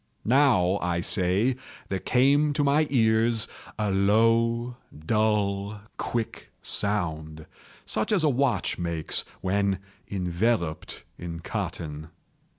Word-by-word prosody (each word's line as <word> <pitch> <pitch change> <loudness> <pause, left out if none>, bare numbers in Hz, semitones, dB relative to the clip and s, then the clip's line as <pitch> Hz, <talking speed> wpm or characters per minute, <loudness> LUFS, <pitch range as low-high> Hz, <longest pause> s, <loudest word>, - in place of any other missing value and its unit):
—now, 110 -8 +4
I 85 -1 0
say, 100 +7 +1 0.3
there 95 - -1
came 140 +6 +3
to 145 0 +1
my 145 +2 +3
ears 115 -2 +2 0.3
a 105 -2 0
low, 115 +4 +2 0.3
dull, 105 -1 0 0.2
quick 115 -2 -4
sound, 80 -6 -2 0.4
such 110 - -1
as 195 -6 +3
a - - +4
watch 130 -10 +1
makes 85 -3 -2 0.2
when 100 +1 +1 0.3
enveloped 90 -2 -1 0.2
in 85 -1 -6
cotton. 75 -1 -5
105 Hz, 105 wpm, -26 LUFS, 90-120 Hz, 0.4 s, now